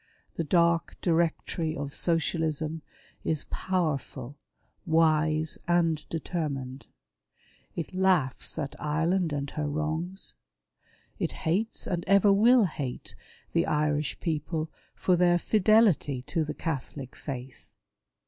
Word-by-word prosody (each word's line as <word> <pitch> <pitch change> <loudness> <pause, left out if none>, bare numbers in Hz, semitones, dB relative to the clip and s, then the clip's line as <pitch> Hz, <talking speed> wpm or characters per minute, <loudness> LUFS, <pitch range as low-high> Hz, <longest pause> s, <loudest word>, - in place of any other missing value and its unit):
The 165 - -1
dark 170 +1 +2
directory 165 -1 0
of 140 0 -4
Socialism 160 -2 0 0.4
is 155 -3 -1
powerful, 145 -7 -2 0.5
wise, 155 -1 +3
and 165 -3 +2
determined. 140 -6 -4 0.9
It 170 +1 -4
laughs 185 -10 +1
at 140 -3 -3
Ireland 165 +3 +1
and 140 -1 -3
her 150 -1 -2
wrongs. 155 +5 -2 0.9
It - - -1
hates, 200 +8 0
and 175 -2 -2
ever 200 +1 +6
will 230 +3 +6
hate, 140 -7 -5 0.4
the - - +2
Irish 150 -1 0
people 155 0 -2 0.2
for 185 - +2
their 175 0 +4
fidelity 200 - +3
to 155 +4 -1
the 150 0 -4
Catholic 140 -3 -4
faith. 130 -2 -8
160 Hz, 110 wpm, -28 LUFS, 150-175 Hz, 0.9 s, ever